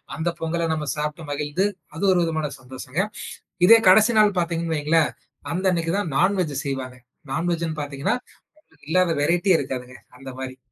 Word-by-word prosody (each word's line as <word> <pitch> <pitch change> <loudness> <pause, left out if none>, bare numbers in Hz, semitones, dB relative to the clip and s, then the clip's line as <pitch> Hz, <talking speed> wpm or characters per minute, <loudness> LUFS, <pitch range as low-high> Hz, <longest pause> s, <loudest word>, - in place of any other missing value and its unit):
அந்த 160 +2 -1
பொங்கல 165 +1 -1
நம்ம 150 -2 -3
சாப்ட்டு 150 +2 -3
மகிழ்ந்து 150 +6 -1 0.3
அது 165 - -5
ஒரு 180 - +3
விதமான 160 -3 -1
சந்தோஷங்க. 130 +5 -4 0.7
இதே 230 +2 +9
கடசி 220 +5 +6
நாள் 205 -2 +4
பாத்தீங்கன்னு 165 -1 -1
வைங்ளேன். 155 +1 +2 0.4
அந்த 185 +2 -1
அன்னைக்கி 165 -1 -1
தான் 170 -8 -2
நான் 190 +5 +3
வெஜ் 150 -6 -2
செய்வாங்க. 130 -2 -4 0.4
நான் 165 +5 -1
வெஜ்ன்னு 160 -2 -2
பாத்தீங்கன்னா, 140 - -1 0.7
இல்லாத 180 +1 +3
வெரைட்டியே 175 +4 +3
இருக்காதுங்க 125 -2 -5 0.2
அந்த 135 0 -9
மாரி. 130 0 -6
160 Hz, 155 wpm, -23 LUFS, 140-175 Hz, 0.7 s, இதே